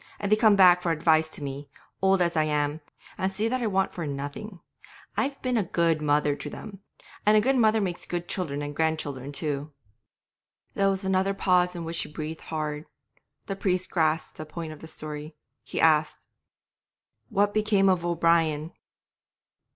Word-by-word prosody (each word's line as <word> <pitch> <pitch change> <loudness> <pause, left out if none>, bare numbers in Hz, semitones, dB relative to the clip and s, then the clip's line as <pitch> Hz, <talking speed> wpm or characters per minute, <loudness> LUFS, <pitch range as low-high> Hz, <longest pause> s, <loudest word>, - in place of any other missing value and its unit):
And 200 0 -3
they - - +7
come 215 -1 +5
back 180 -2 +7
for 170 - 0
advice 160 0 +3
to 155 - -8
me, 140 +1 -6 0.3
old 190 -1 +4
as 170 -1 -1
I 155 -1 +3
am, 150 0 -1 0.4
and 190 +1 0
see 210 +3 -1
that 255 +2 -1
I 230 - 0
want 195 -2 0
for 170 -4 -4
nothing. 145 +8 -6 0.6
I've 275 0 -1
been 250 -2 +1
a 215 - +2
good 165 -2 +1
mother 145 -1 +2
to 145 - -7
them, 195 +5 -9 0.4
and 210 +1 +5
a - - +7
good 265 +5 +2
mother 220 -3 +4
makes 180 -4 -3
good 175 0 -3
children 145 -6 -3
and 145 0 -5
grandchildren 145 -4 -2
too.' 145 0 -3 1.0
There 195 0 +2
was 195 0 -2
another 190 +1 +1
pause 180 -2 +2
in 170 -1 -5
which 165 +1 -3
she - - -1
breathed 155 +1 -6
hard; 150 -1 -4 0.6
the 195 - -4
priest 185 -2 -1
grasped 160 -2 0
the 155 - -5
point 160 0 -6
of 155 - -13
the 160 - -10
story; 155 0 -7 0.3
he - - -4
asked 155 -1 +2 1.0
'What 205 +1 +2
became 210 -2 +3
of 185 -3 +2
O'Brien?' 165 -2 +1
170 Hz, 180 wpm, -26 LUFS, 155-195 Hz, 1.0 s, they